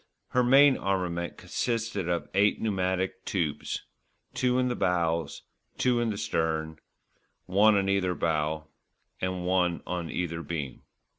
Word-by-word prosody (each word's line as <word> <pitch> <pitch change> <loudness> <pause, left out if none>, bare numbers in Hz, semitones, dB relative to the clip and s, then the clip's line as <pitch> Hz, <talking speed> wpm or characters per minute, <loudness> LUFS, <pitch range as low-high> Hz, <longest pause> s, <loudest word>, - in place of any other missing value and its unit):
Her 125 - +2
main 135 +2 +6
armament 90 -3 -2
consisted 115 -6 -2
of 85 -1 -1
eight 100 +2 +3
pneumatic 95 -3 -1
tubes, 85 -7 -2 0.5
two 125 -1 +1
in 130 0 +2
the 125 - -1
bows, 85 -3 0 0.3
two 125 -2 +2
in 120 -1 +1
the 105 - -3
stern, 80 -4 -1 0.7
one 105 +3 +5
on 100 -1 +1
either 95 -2 +1
bow 80 -1 -1 0.6
and 95 -1 -2
one 90 -2 +1
on 90 -2 -3
either 85 -2 -3
beam. 75 -6 -5
90 Hz, 135 wpm, -28 LUFS, 85-105 Hz, 0.7 s, main